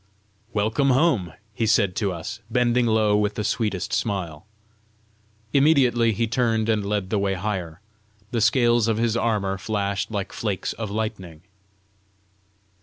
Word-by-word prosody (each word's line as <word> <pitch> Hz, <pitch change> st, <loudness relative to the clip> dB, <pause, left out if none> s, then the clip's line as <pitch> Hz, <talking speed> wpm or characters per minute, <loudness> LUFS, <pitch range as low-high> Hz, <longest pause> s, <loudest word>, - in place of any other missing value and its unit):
"Welcome 110 Hz, +6 st, +1 dB
home!" 130 Hz, -, +2 dB, 0.2 s
he 110 Hz, +2 st, -1 dB
said 105 Hz, -4 st, +2 dB
to 100 Hz, -3 st, 0 dB
us, 90 Hz, +6 st, -6 dB
bending 120 Hz, 0 st, +2 dB
low 110 Hz, -2 st, +3 dB
with 105 Hz, 0 st, 0 dB
the 105 Hz, -, -2 dB
sweetest 105 Hz, -4 st, -2 dB
smile. 95 Hz, -6 st, -3 dB, 1.1 s
Immediately 130 Hz, -6 st, +4 dB
he 115 Hz, +3 st, 0 dB
turned 115 Hz, -1 st, 0 dB
and 110 Hz, -2 st, +1 dB
led 100 Hz, -2 st, -2 dB
the 105 Hz, -, +1 dB
way 100 Hz, -1 st, 0 dB
higher. 90 Hz, -3 st, -4 dB, 0.5 s
The 115 Hz, -2 st, 0 dB
scales 120 Hz, -1 st, +3 dB
of 110 Hz, -1 st, +1 dB
his 115 Hz, 0 st, +1 dB
armour 105 Hz, -5 st, 0 dB
flashed 100 Hz, 0 st, -2 dB
like 100 Hz, -3 st, -4 dB
flakes 105 Hz, -4 st, -3 dB
of 110 Hz, -3 st, -5 dB
lightning. 100 Hz, -7 st, -5 dB
110 Hz, 140 wpm, -23 LUFS, 100-115 Hz, 1.1 s, Immediately